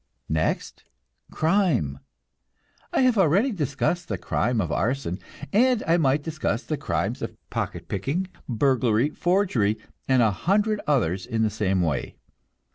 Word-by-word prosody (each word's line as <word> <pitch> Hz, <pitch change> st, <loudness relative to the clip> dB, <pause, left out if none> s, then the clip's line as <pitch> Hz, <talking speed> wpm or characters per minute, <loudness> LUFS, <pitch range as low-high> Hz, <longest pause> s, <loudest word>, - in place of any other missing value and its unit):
Next, 80 Hz, 0 st, -1 dB, 0.5 s
crime. 160 Hz, -, +1 dB, 0.9 s
I -, -, +2 dB
have 250 Hz, -4 st, +3 dB
already 195 Hz, -, +4 dB
discussed 160 Hz, -, -1 dB
the 100 Hz, -, -2 dB
crime 115 Hz, +6 st, 0 dB
of 85 Hz, -6 st, -1 dB
arson, 120 Hz, -6 st, -1 dB, 0.3 s
and 245 Hz, +2 st, +4 dB
I 165 Hz, +1 st, +3 dB
might 145 Hz, -2 st, +2 dB
discuss 155 Hz, -8 st, -2 dB
the 155 Hz, -, -2 dB
crimes -, -, -2 dB
of -, -, -5 dB
pocket -, -, -3 dB
picking, 140 Hz, -, -1 dB, 0.2 s
burglary, 125 Hz, +1 st, +2 dB
forgery, 175 Hz, -, +1 dB, 0.3 s
and 130 Hz, -2 st, +4 dB
a 110 Hz, -, +4 dB
hundred 205 Hz, -, +1 dB
others 100 Hz, -, +1 dB
in 115 Hz, -2 st, 0 dB
the 110 Hz, -, +1 dB
same 95 Hz, -3 st, +1 dB
way. 75 Hz, -5 st, -2 dB
135 Hz, 135 wpm, -25 LUFS, 105-175 Hz, 0.9 s, already